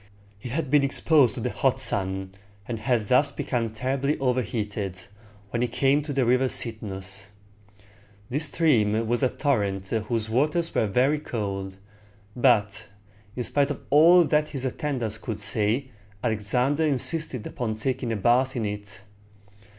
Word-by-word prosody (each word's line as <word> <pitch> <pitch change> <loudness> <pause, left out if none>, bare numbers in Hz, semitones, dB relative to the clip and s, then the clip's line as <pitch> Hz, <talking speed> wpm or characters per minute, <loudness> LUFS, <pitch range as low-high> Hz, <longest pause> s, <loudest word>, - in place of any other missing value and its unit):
He 120 - -7
had 140 +1 -3
been 145 -1 +5
exposed 140 -2 +3
to - - -5
the - - -2
hot - - +1
sun, 95 0 -1 0.4
and 115 -2 -4
had 115 -2 0
thus 140 +4 +4
become 120 -4 -2
terribly 130 +6 -1
overheated, 105 -7 -2 0.5
when 120 - -1
he 125 - +2
came 135 +4 +2
to 150 0 -6
the 135 -2 +1
river 125 +2 +3
Cyd´nus. 100 -5 -2 1.0
This 145 +7 +3
stream 115 -9 +2
was 120 +1 0
a 130 - +3
torrent 100 -10 -1
whose 110 0 -1
waters 150 +9 0
were 110 - +1
very 130 +9 +2
cold, 95 -7 -4 0.6
but, 105 -4 +2 0.5
in 125 - -2
spite 140 +3 +1
of 145 - -4
all 170 +5 +7
that 150 -1 +1
his 135 -3 -4
attendants 125 -5 -3
could 110 -3 -5
say, 110 +5 0 0.3
Alexander 125 +7 +1
insisted 145 -3 -1
upon 110 -3 -3
taking 120 +1 -2
a - - 0
bath 125 +6 +2
in 115 -3 -1
it. 105 -1 -6
120 Hz, 150 wpm, -25 LUFS, 105-140 Hz, 1.0 s, all